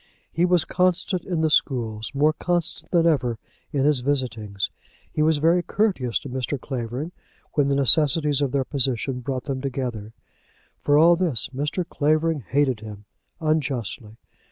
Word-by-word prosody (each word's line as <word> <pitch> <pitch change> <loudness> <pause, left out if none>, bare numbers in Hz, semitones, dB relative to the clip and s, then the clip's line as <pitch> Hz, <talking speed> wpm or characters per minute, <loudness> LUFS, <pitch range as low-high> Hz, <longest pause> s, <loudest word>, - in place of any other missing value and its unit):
He 170 - +2
was 180 -2 +2
constant 185 0 0
in 175 -4 -1
the 160 - +2
schools, 115 -7 0
more 150 +3 +3
constant 170 -1 -2
than 170 -2 +3
ever 125 -8 +1 0.3
in 140 -3 0
his 150 -3 +3
visitings. 115 -7 -2 0.4
He - - -1
was 155 0 +3
very 165 +4 +3
courteous 175 - 0
to 140 - -8
Mr. 130 +2 -3
Clavering 125 +5 -5 0.4
when 145 -2 +2
the 140 - +1
necessities 145 +1 +4
of 140 -3 0
their 135 -1 0
position 130 -2 -1
brought 130 +1 -4
them 135 -3 -4
together. 125 -6 -4 0.7
For 145 0 +3
all 170 +3 +6
this 165 - +2
Mr. 150 +6 -2
Clavering 155 +1 +1
hated 130 0 0
him, 105 -1 -10 0.3
unjustly. 135 -8 -2
140 Hz, 155 wpm, -23 LUFS, 125-160 Hz, 0.7 s, all